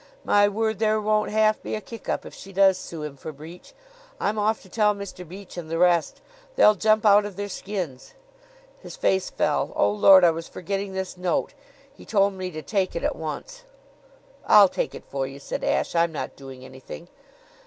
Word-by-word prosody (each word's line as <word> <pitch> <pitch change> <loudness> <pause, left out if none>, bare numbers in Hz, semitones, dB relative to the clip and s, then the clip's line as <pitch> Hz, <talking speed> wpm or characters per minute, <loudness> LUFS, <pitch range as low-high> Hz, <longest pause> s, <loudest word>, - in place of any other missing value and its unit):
My 205 0 +4
word! 220 0 -1
There 215 -1 +2
won't 215 0 +1
half 215 0 +2
be - - -4
a - - -3
kick 225 +2 -10
up - - -2
if - - -10
she 195 - -11
does 190 -1 +4
sue 160 -3 -7
him 145 -2 -7
for 155 - -7
breach! 160 - -13 0.4
I'm 210 +1 -1
off 215 +1 +1
to - - -16
tell 210 +1 +2
Mr. 190 -3 -8
Beach 190 0 -11
and 165 -2 -6
the 165 - -2
rest. 175 -1 +2 0.3
They'll 210 - +6
jump 215 +1 +2
out 205 0 +6
of 205 -2 -7
their 205 +1 -4
skins." 185 - -6 0.6
His - - -10
face 190 - 0
fell. - - 0
"Oh, 100 - +3
Lord, 185 - +7
I 170 - +6
was 165 +1 -6
forgetting 195 +2 -4
this 190 -1 -5
note. 180 -2 -1 0.4
He - - -15
told 200 -2 +2
me 185 -1 -5
to 155 -3 -8
take 195 -3 -1
it 170 - -3
at - - 0
once." 160 - -7 0.9
"I'll 205 -3 +8
take - - -3
it - - -10
for 135 -1 -3
you," 135 +1 -10
said 140 - -6
Ashe. - - 0
"I'm 170 0 +2
not 155 - -5
doing 135 -2 -11
anything." 130 +6 -11
190 Hz, 205 wpm, -24 LUFS, 165-210 Hz, 0.9 s, I'll